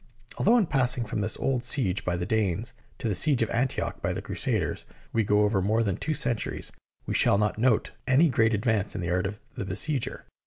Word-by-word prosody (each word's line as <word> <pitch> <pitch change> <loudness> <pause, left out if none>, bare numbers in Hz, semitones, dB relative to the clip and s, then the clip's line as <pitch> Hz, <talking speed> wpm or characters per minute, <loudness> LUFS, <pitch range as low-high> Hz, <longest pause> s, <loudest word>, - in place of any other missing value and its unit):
Although 230 +5 +5
in 220 - +3
passing 125 -5 +1
from 105 -1 -3
this 105 +2 -1
old 130 -3 -1
siege 120 -7 +1
by 90 -1 -1
the 90 - -3
Danes 110 +3 -1 0.2
to - - -3
the 105 - +1
siege 130 - +3
of 115 - -3
Antioch 125 +3 -1
by - - -1
the - - -4
Crusaders - - -2 0.3
we 115 - +2
go 105 +1 +3
over 105 -2 +2
more 110 +4 +2
than 100 -4 0
two 155 - -2
centuries, 115 -6 -1 0.3
we - - -3
shall - - +4
not 105 +1 0
note 120 -2 +2 0.2
any 135 +6 +5
great 115 -5 +2
advance 105 -2 0
in - - -3
the 85 0 -2
art 90 +1 +1
of 105 +2 -7
the - - -4
besieger. 115 +8 -1
110 Hz, 220 wpm, -27 LUFS, 100-125 Hz, 0.3 s, Although